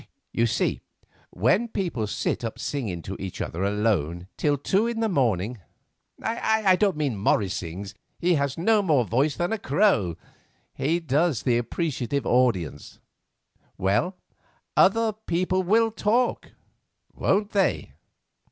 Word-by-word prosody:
You 115 - +2
see, 110 - 0 0.5
when 130 - +2
people 170 - -2
sit 105 - -2
up 115 - -4
singing 105 - -3
to 95 - -5
each 95 -1 -6
other 85 +4 -3
alone 100 -5 0
till 145 -1 +1
two 195 - +1
in 235 -1 -2
the 225 - +1
morning—I 140 - -1
don't 195 -4 +1
mean 150 -3 0
that - - -6
Morris 100 -1 +1
sings, 95 +4 -6 0.2
he 180 +1 +2
has 140 -3 0
no 210 +5 +3
more 150 -10 +2
voice 135 +7 +1
than 175 +5 -1
a 225 - -2
crow; 140 - +2 0.6
he 165 +5 0
does 155 -3 +1
the 120 -2 +2
appreciative 140 0 -2
audience—well, 105 - -2 0.6
other 225 -1 +4
people 185 -3 -1
will 220 +5 +3
talk, 230 +3 0 0.6
won't 205 +2 +1
they?" 195 -2 0
145 Hz, 130 wpm, -25 LUFS, -, 0.6 s, other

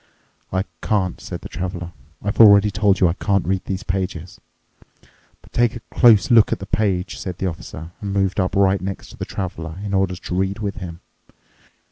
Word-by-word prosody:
"I 95 +1 0 0.2
can't," 95 -4 0
said - - -7
the - - -7
Traveler. 90 0 -5 0.3
"I've 100 +1 -3
already 105 -2 +8
told 100 -1 +2
you 90 - +5
I 85 - +1
can't 100 -1 0
read 95 +2 -1
these 95 +2 -3
pages." 90 -2 -4 1.0
"But - - -20
take 120 -1 +2
a - - -5
close 115 -2 +5
look 115 -3 +6
at - - +1
the 95 - -8
page," 100 -2 -1
said 90 -2 -5
the 95 - -3
Officer, 80 -1 -6
and 100 -2 -4
moved 95 0 0
up 95 +1 0
right 95 -1 +3
next 95 +1 -5
to - - -13
the - - -4
Traveler 85 -3 -5
in 100 - -4
order 95 -1 +1
to 90 - -6
read 95 +1 0
with 105 -1 -4
him. 85 -4 -7
95 Hz, 195 wpm, -21 LUFS, 90-100 Hz, 1.0 s, already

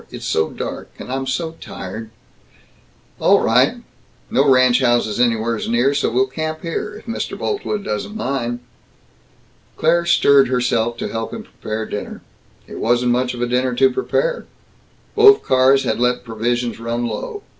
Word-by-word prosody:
It's - - -8
so 80 0 +1
dark, - - -6
and - - -8
I'm 135 0 -3
so 160 +5 -2
tired 110 +4 -7 0.6
" - - -34
"All - - +5
right. - - +2 0.5
No 140 +1 +3
ranch 130 -1 +5
houses 120 -3 +1
anywheres 115 -2 0
near, 120 +4 +2
so 145 - 0
we'll 125 +3 +2
camp 155 +3 -5
here, 210 +5 -4
if 210 - -12
Mr. 230 - -4
Boltwood 310 - -3
doesn't 155 - -4
mind." 125 - -3 1.2
Claire 170 +2 +2
stirred 140 -5 +5
herself 120 -2 0
to - - -3
help 115 0 -4
him - - -6
prepare 110 0 -5
dinner. 105 - -6 0.4
It - - -9
wasn't 120 +1 +2
much 125 0 0
of 120 - -3
a - - 0
dinner 125 +1 0
to 130 +1 +4
prepare. - - -1 0.7
Both 420 -1 +6
cars 130 +1 +4
had 110 - -1
let 125 0 +1
provisions 120 0 -2
run 115 +1 -2
low. 120 - -5
125 Hz, 160 wpm, -19 LUFS, 120-140 Hz, 1.2 s, Both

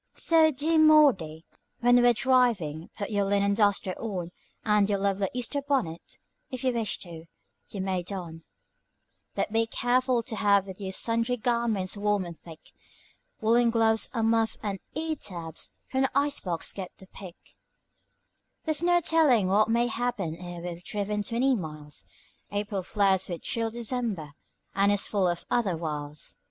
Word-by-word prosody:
So, 325 -1 +4
dear 315 +3 +1
Maudy, 265 - +4 0.4
when 245 0 +5
we're 240 0 +5
driving, 230 - +1
put 205 +1 -4
your 205 -1 +1
linen 200 0 +2
duster 200 -3 +2
on, 185 -6 -4 0.3
And 210 -2 +3
your 200 - +2
lovely 195 -1 0
Easter 250 +3 -2
bonnet, 260 - -2 0.3
if 255 0 -6
you 255 -1 +2
wish 230 -3 -1
to, 165 -3 -9 0.4
you 200 - -5
may 190 -1 -1
don; 175 -3 -7 0.9
But 210 - -2
be 225 0 +2
careful 245 +1 +1
to 225 -1 -5
have 200 -2 +3
with 190 +1 -10
you 190 -1 -4
sundry 230 +4 0
garments 225 -5 0
warm 205 -2 0
and 170 -1 -8
thick: 160 -1 -14 0.7
Woollen 235 +2 +4
gloves, 225 -1 +2
a 230 -3 -1
muff, 225 0 +1
and 200 -2 -3 0.2
ear 315 +1 -1
tabs, 165 - -6 0.2
from 265 - +1
the 265 - +1
ice 285 0 +1
box 170 -3 -3
get 190 -2 -6
the 190 - -14
pick; 185 -2 -11 1.3
There's 315 -1 +1
no 350 0 +3
telling 300 - +3
what 210 +3 +3
may 235 +1 +3
happen 230 -8 -2
ere 175 0 -8
we've 175 0 -6
driven 210 +1 -2
twenty 240 +6 +1
miles, 150 -6 -7 0.5
April 205 -1 -2
flirts 190 0 +1
with 170 -2 -5
chill 230 -1 -1
December, 225 - -2 0.4
and 200 +1 +3
is 205 -1 0
full 195 -3 +1
of 175 -1 -2
other 200 -8 +1
wiles. 150 -2 -6
210 Hz, 160 wpm, -27 LUFS, 185-240 Hz, 1.3 s, when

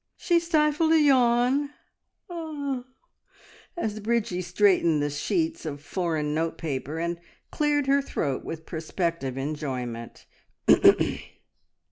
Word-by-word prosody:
She 345 -3 +2
stifled 315 -1 +2
a 320 - +6
yawn 265 +1 +3 2.0
as 215 -9 -2
Bridgie 215 -4 -1
straightened 180 -3 +3
the 145 0 -1
sheets 320 - -1
of 145 -2 -5
foreign 155 -1 -2
note 160 +1 -1
paper, 150 -1 -4
and 170 +1 -2 0.3
cleared 295 -1 +1
her 275 +1 +3
throat 140 - -2
with 160 -1 -7
prospective 165 -4 -3
enjoyment. 130 -5 -5
175 Hz, 100 wpm, -26 LUFS, -, 2.0 s, a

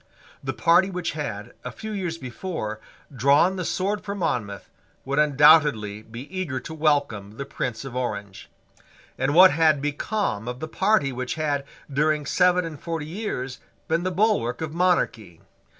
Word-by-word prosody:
The - - -2
party 185 +3 +4
which 180 -2 -3
had, 115 -7 -5
a - - -4
few 220 0 -7
years 180 -5 -3
before, 125 - -5 0.4
drawn 140 +9 +4
the 185 - -3
sword 200 +4 -1
for 200 -1 -4
Monmouth 115 - -2 0.4
would 140 +2 0
undoubtedly 145 -8 +4
be 115 +2 -9
eager 160 -9 -2
to 160 - -8
welcome 140 -10 0
the 140 - -4
Prince 125 -2 -4
of 130 -2 -7
Orange. 100 -6 -4 0.7
And 135 +3 0
what 185 +2 +9
had 155 -2 +3
become 145 - -2
of 125 0 -5
the 155 - -4
party 155 -4 +2
which 125 0 -4
had, 145 -3 -1 0.3
during 150 +1 +1
seven 180 +3 +3
and 155 -4 -8
forty 165 -3 -4
years, 150 - -4 0.3
been 165 +1 +1
the 185 - -1
bulwark 185 - +1
of 155 -1 -4
monarchy? 160 - 0
150 Hz, 160 wpm, -24 LUFS, 125-175 Hz, 0.7 s, what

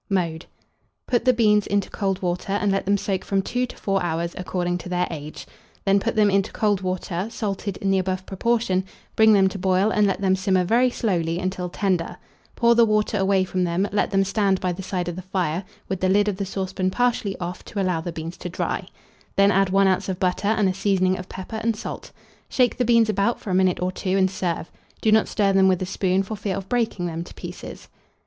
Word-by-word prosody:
Mode. 170 -4 -1 0.6
Put 240 0 0
the 255 - +6
beans 210 -4 +3
into 200 -1 0
cold 195 -2 -2
water, 180 +2 -2
and 205 0 +1
let 195 0 0
them 200 0 +3
soak 190 -1 -2
from 195 -1 0
2 250 +4 -1
to - - -11
4 195 -1 0
hours, 170 0 -2
according 180 -1 -2
to 180 - -8
their 180 0 +1
age; 150 0 -7 0.4
then 200 0 +4
put 230 +3 -2
them 210 -2 +4
into 195 +1 +1
cold 205 -3 +1
water, 185 0 -3
salted 200 -3 -3
in 195 - 0
the 190 - +3
above 185 0 -2
proportion, 195 -2 0 0.3
bring 220 0 +6
them 195 -2 +5
to 195 - -7
boil, 190 +3 +2
and 210 -1 +3
let 195 - -1
them 190 -1 +2
simmer 190 -1 +1
very 235 +7 +3
slowly 175 -9 -1
until 185 0 -3
tender; 180 -3 -1 0.4
pour 235 0 +4
the 235 0 +5
water 215 -1 +1
away 190 0 +3
from 185 0 -1
them, 180 +3 0
let 205 - +1
them 195 -1 +2
stand 195 -1 +1
by 185 - -1
the 175 +2 -5
side 180 -2 -3
of 175 - -3
the 185 - -6
fire, 185 -2 -2 0.2
with 190 -1 -3
the 185 - +2
lid 205 +2 +3
of 200 -3 -1
the 200 -1 -3
saucepan 190 -1 -2
partially 225 -2 0
off, 175 0 -5
to 205 - -5
allow 180 -4 0
the 175 - -4
beans 165 +1 -6
to 180 - -6
dry; 175 - -3 0.5
then 200 0 +5
add 195 -1 +3
1 195 +1 +4
oz. 190 0 +1
of 185 -1 -3
butter 185 +2 0
and 215 -2 +2
a 185 - +1
seasoning 185 -1 +1
of 185 0 -8
pepper 205 +4 -6
and 230 0 +1
salt. - - -7 0.4
Shake 250 -2 +2
the 250 - +1
beans 230 -1 +4
about 205 +3 +1
for 195 - -6
a - - 0
minute 185 -1 +2
or 180 0 -1
two, 185 +1 -1
and 190 -1 +3
serve: 175 -3 -3 0.3
do 220 - +2
not 220 0 +4
stir 200 -2 +1
them 190 0 +5
with 185 -2 +3
a 185 - -2
spoon, 190 0 0
for 215 +3 -5
fear 200 -2 -3
of 195 - -6
breaking 225 -7 0
them 165 -1 -3
to - - -13
pieces. - - -9
190 Hz, 235 wpm, -23 LUFS, 185-205 Hz, 0.6 s, the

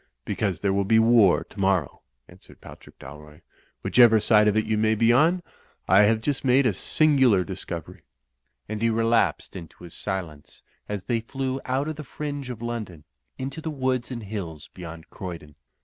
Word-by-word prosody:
"Because 95 -6 -2
there 100 -1 +1
will 100 0 +1
be 110 +3 +3
war 110 -4 +5
tomorrow," 95 -7 -1 0.3
answered - - -18
Patrick - - -14
Dalroy, 75 +2 -13 0.4
"whichever 120 -3 +5
side 105 0 +4
of 105 0 +2
it 110 - +1
you 110 - 0
may 110 +1 +2
be 115 +2 +3
on. 165 +7 +3 0.4
I 95 +2 +5
have 110 +1 +2
just 140 +3 -2
made 130 +1 +3
a 120 - +2
singular 130 - +3
discovery." 90 -3 -7 0.7
And 110 0 -5
he 115 - +2
relapsed 115 -6 +1
into 85 -1 -11
his 85 - -11
silence 80 -6 -6 0.3
as 105 -2 -4
they 115 +2 -1
flew 130 +3 -4
out 135 +3 -1
of 155 -1 -5
the 155 - -6
fringe 145 -1 -6
of 120 -2 -7
London 110 -10 -5 0.3
into 135 +4 -6
the 160 - -4
woods 130 -4 -2
and 120 -3 -6
hills 85 -8 -7
beyond 85 -2 -10
Croydon. 85 -5 -8
110 Hz, 175 wpm, -25 LUFS, 95-130 Hz, 0.7 s, war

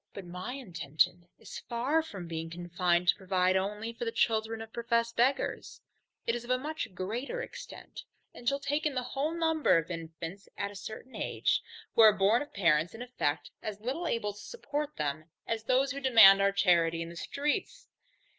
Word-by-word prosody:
But 200 - -7
my 180 +7 -6
intention 175 - -1
is - - -9
very - - -20
far 255 +7 +1
from 195 - -8
being 165 0 -4
confined 175 +1 0
to - - +6
provide 185 -1 +1
only 210 +4 -2
for 230 - -6
the 230 - -1
children 220 0 +1
of 225 0 -9
professed 235 0 0
beggars: 260 +4 0 0.5
it 230 - +1
is 240 0 -3
of 240 - -12
a 255 - +3
much 280 -7 -5
greater 235 - -3
extent, - - -9 0.3
and 240 - -1
shall 275 - -1
take 290 +2 0
in 290 - -4
the 255 - 0
whole 270 +4 -2
number 320 - +3
of 165 +2 -2
infants 165 +3 -7
at 200 0 -2
a - - -12
certain 220 +6 -8
age, - - 0 0.3
who - - +5
are 215 -1 +9
born 200 +5 +4
of 290 - -7
parents 165 -2 +2
in 235 - -6
effect 145 -12 -2
as 210 -1 -5
little 270 +10 -3
able 210 -6 -1
to 205 - -13
support 300 - -4
them, 150 +1 -2 0.2
as 225 -1 -3
those 265 +3 +2
who 280 - -4
demand 225 -7 +8
our 200 0 +4
charity 170 -4 +3
in 165 - -8
the 170 - -10
streets. 295 - -2
220 Hz, 195 wpm, -30 LUFS, 180-255 Hz, 0.5 s, are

